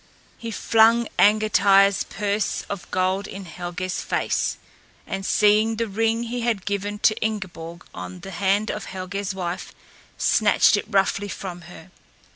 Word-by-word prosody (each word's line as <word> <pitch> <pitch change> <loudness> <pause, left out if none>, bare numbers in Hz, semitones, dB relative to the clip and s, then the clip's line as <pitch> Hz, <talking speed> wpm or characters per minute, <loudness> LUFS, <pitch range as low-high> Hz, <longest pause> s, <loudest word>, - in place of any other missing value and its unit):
He 230 - -7
flung 225 +1 +3
Angantyr's 200 -2 +5
purse 205 0 -2
of 200 -3 -6
gold 185 +2 0
in 195 0 -8
Helgé's 175 +1 -4
face, - - -1 0.5
and 195 0 -4
seeing 210 +3 +3
the 230 +1 -1
ring 225 +3 0
he 240 +1 -4
had 230 -5 -1
given 205 0 -2
to 215 - +5
Ingeborg 175 -6 -5
on 180 -1 -8
the 195 +1 -8
hand 200 +3 +1
of 210 - -6
Helgé's 190 +1 -4
wife 180 -2 -5 0.4
snatched 215 0 +4
it 205 - -2
roughly 200 0 +1
from 185 -3 -7
her. 175 +1 -13
200 Hz, 140 wpm, -23 LUFS, 185-215 Hz, 0.5 s, Angantyr's